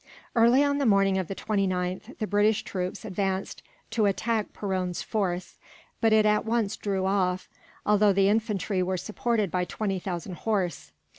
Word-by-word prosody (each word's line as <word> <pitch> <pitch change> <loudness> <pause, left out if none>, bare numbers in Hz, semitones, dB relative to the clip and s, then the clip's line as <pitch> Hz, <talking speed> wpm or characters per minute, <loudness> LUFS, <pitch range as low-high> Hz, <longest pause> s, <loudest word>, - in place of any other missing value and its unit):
Early 240 +4 +5
on 285 0 +1
the 275 - +2
morning 195 -2 +4
of 185 - -3
the 195 - -5
29th, 190 +1 -2
the 215 - -2
British 205 +1 +2
troops 180 -1 -4
advanced 190 -1 -2 0.3
to 215 -3 +2
attack 215 +2 -1
Perron's 185 -3 -2
force; 185 -5 -2 0.4
but 225 - +4
it 215 -1 +5
at 210 0 +3
once 225 -2 0
drew 195 -2 -2
off, 185 -1 0 0.4
although 210 0 +4
the 195 0 +3
infantry 210 -3 0
were 185 +1 0
supported 215 0 -1
by 180 -1 0
twenty 195 +1 -2
thousand 175 -1 -5
horse. 180 - -2
200 Hz, 160 wpm, -27 LUFS, 185-215 Hz, 0.4 s, Early